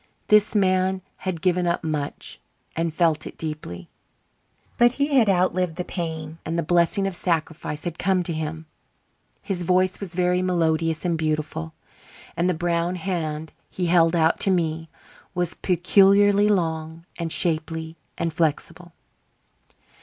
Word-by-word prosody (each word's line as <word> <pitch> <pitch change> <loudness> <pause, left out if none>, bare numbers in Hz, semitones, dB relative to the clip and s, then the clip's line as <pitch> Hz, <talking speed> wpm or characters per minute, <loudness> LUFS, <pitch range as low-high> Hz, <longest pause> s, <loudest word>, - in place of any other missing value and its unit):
This 210 +1 +5
man 185 -1 +2
had 180 -4 -4
given 180 -1 +2
up 170 0 0
much 150 -3 -4 0.4
and 165 0 -1
felt 160 -1 +1
it - - -11
deeply; 150 - -6 0.9
but 240 0 +5
he 285 +2 -1
had 230 -6 +5
outlived 180 -2 +1
the 180 - -3
pain 160 -2 -5
and 165 +2 -3
the 170 - 0
blessing 175 +5 +2
of 195 -2 -2
sacrifice 160 -3 -2
had 175 -2 -5
come 185 -1 +1
to 170 - -3
him. 160 +1 -4 0.8
His 190 -4 -3
voice 185 +1 +2
was 185 -4 -6
very 180 0 +2
melodious 165 -2 0
and 170 -2 0
beautiful, 155 - -2 0.6
and 175 +2 +1
the 180 - +1
brown 170 +1 0
hand 160 -4 -3 0.2
he 180 - -3
held 170 -1 +4
out 160 -1 +3
to - - +2
me 165 -3 0 0.5
was 175 -2 -1
peculiarly 200 +3 +4
long 165 -3 -1
and 165 -1 -2
shapely 160 -1 0 0.2
and 165 -1 -1
flexible. 165 +2 -2
170 Hz, 145 wpm, -24 LUFS, 160-185 Hz, 0.9 s, This